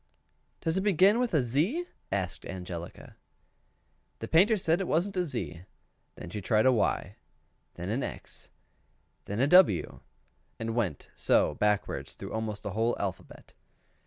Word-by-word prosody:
"Does 165 +2 0
it - - +2
begin 200 +2 +4
with 245 -2 0
a 145 - +3
Z?" 165 - 0 0.3
asked 95 -3 -2
Angelica. 90 -2 -8 1.0
The 115 - -6
Painter 195 - +5
said 170 -1 +1
it 190 - -2
wasn't 190 +5 0
a 180 - +1
Z; 95 - -4 0.5
then 85 - -9
she 105 - -4
tried 110 +3 +2
a 130 - +6
Y; 120 - 0 0.6
then 90 +2 -5
an 115 +6 -1
X; - - -7 0.8
then 100 +2 -4
a 130 - +4
W, 150 - +4 0.6
and 115 0 -3
went 100 - -2
so - - +2
backward 105 -1 0
through - - -8
almost 110 -2 -3
the 100 - -3
whole 115 +4 +1
alphabet. 95 -3 -6
115 Hz, 150 wpm, -29 LUFS, -, 1.0 s, a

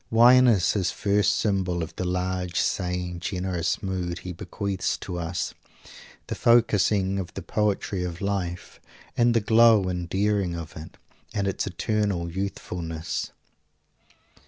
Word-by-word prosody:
Wine 125 +3 +7
is 100 -8 +4
his 95 -4 0
first 105 -1 +1
symbol 95 -4 0
of 80 - -8
the 90 - -3
large, 90 0 -1
sane, 90 -1 -1
generous 90 -1 -2
mood 90 -3 -2
he 90 - -7
bequeaths 95 +2 -3
to 90 -2 -5
us 85 +1 -3 0.7
the - - -4
focusing 105 -4 +3
of 90 -2 -5
the - - -5
poetry 100 -3 -1
of 85 -1 -5
life, 95 -3 -3 0.4
and 120 0 +3
the - - +5
glow 110 -2 +5
and 90 -1 -3
daring 100 -2 0
of 80 -2 -7
it, 80 +1 -10 0.4
and 100 -1 0
its 95 - -2
eternal 100 -2 -1
youthfulness. 85 -4 -4
95 Hz, 135 wpm, -25 LUFS, 90-105 Hz, 0.7 s, Wine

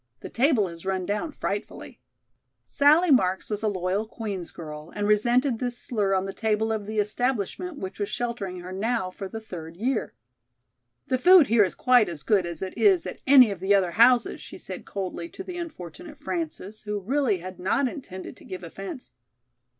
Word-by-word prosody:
The - - -7
table 245 -5 +2
has 170 -1 -10
run 190 -1 -1
down 210 - -2
frightfully." 205 -7 -5 0.7
Sallie 305 +4 +4
Marks 190 -6 +2
was 210 - -2
a 220 - 0
loyal 190 +2 -1
Queen's 205 -6 -5
girl, 150 -1 -9
and 205 0 -1
resented 240 +4 +3
this 245 -1 -3
slur 205 -6 0
on 190 0 0
the 195 - -5
table 220 0 0
of 215 -2 -3
the 215 0 -4
establishment 245 - -1
which 190 -2 -7
was 205 - -1
sheltering 205 -7 -3
her 180 +1 -8
now 200 0 -1
for 195 +1 -6
the 225 +3 -6
third 170 -6 -9
year. 240 +3 -1 0.9
"The 260 -3 0
food 360 0 +8
here 225 -1 +6
is 185 - -2
quite 245 -6 +4
as 160 -4 -7
good 200 -5 +2
as 170 +1 -5
it 190 - -5
is 380 -4 +4
at - - -7
any 260 -5 +8
of 195 - -5
the 195 +2 +3
other 185 -3 +2
houses," 240 +4 +4
she - - -10
said - - -8
coldly 185 -3 -4
to 380 - -8
the 360 -2 -6
unfortunate 315 - -8
Frances, 295 - -5
who 210 -1 -3
really 240 0 +1
had 185 +1 -9
not 225 +9 +1
intended 200 -8 -8
to - - -15
give 185 -1 -8
offence. 195 - -8
210 Hz, 190 wpm, -26 LUFS, 185-250 Hz, 0.9 s, food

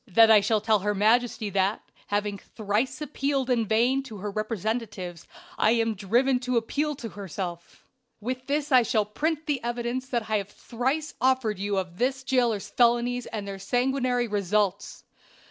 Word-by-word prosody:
Then 225 +3 +6
I 215 -2 +7
shall 210 +1 +1
tell 215 -1 +3
her 210 +2 -1
majesty 220 0 +2
that, 195 +2 0 0.2
having 205 -1 -1
thrice 215 +6 -2
appealed 275 -2 -1
in 230 -3 +1
vain 240 +5 +2
to 230 -6 -9
her 205 +1 -4
representatives, 215 -4 -4 0.3
I 220 - +4
am 225 -1 +1
driven 240 +6 +2
to 250 -1 -1
appeal 290 +6 -1
to 235 -4 -7
herself; 180 -3 -7 0.3
with 255 +3 -4
this 290 +1 -1
I 255 -1 +7
shall 220 -3 +1
print 310 +9 -2
the 285 -6 -1
evidence 240 +2 -3
I 220 -3 0
have 200 0 -7
thrice 265 +8 -3
offered 255 -6 +2
you 200 0 -1
of 180 -2 -4
this 260 +1 0
jailer's 240 -6 +1
felonies 240 +1 +2
and 210 -3 -5
their 195 -1 -6
sanguinary 245 +3 0
results. 205 -1 -1
230 Hz, 165 wpm, -26 LUFS, 205-255 Hz, 0.3 s, I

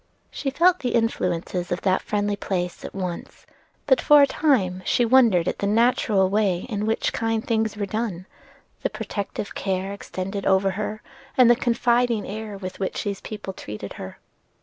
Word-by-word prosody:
She 275 - -3
felt 345 +6 +3
the 245 -3 -1
influences 180 -6 -1
of 175 - -1
that 190 -1 +2
friendly 205 -1 -1
place 180 -3 -3
at - - -8
once; 180 -3 -6 0.4
but - - +4
for 295 -1 +7
a - - +8
time 215 - +1
she 240 - +2
wondered 225 -8 +4
at - - -2
the 200 - 0
natural 215 -3 +3
way 195 -3 +1
in 210 -3 -2
which 220 - 0
kind 225 -1 -1
things 220 -2 0
were 205 - -1
done, 200 -3 -3 0.6
the - - 0
protective 200 0 -5
care 190 0 -2
extended 195 0 -5
over 195 0 +3
her, 210 +2 -4 0.3
and 250 -2 +7
the - - +6
confiding 240 -2 +1
air 210 0 -6
with 185 -1 -7
which 190 - -2
these 200 -2 -3
people 210 -3 -7
treated 105 - -7
her. 95 - -8
205 Hz, 170 wpm, -24 LUFS, 190-230 Hz, 0.6 s, a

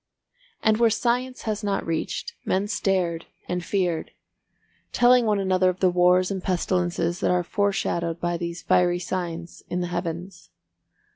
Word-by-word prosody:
And 220 -1 +4
where 230 0 +4
science 250 +3 -1
has 215 -1 -2
not 200 -1 -1
reached, 165 -1 -3
men 195 +2 0
stared 180 -5 0 0.2
and 180 0 -2
feared, 175 -4 -1 0.8
telling 245 -1 +5
one 210 -1 +2
another 185 -1 +2
of 185 0 -3
the 185 -1 +3
wars 180 +1 +4
and 190 -1 -3
pestilences 175 -1 0
that - - +1
are 180 0 +2
foreshadowed 170 -4 -1
by 175 0 -1
these 170 0 -5
fiery 175 -1 +3
signs 175 -1 -5
in 180 - -1
the 175 - -2
Heavens. 175 +1 -5
180 Hz, 150 wpm, -25 LUFS, 175-200 Hz, 0.8 s, telling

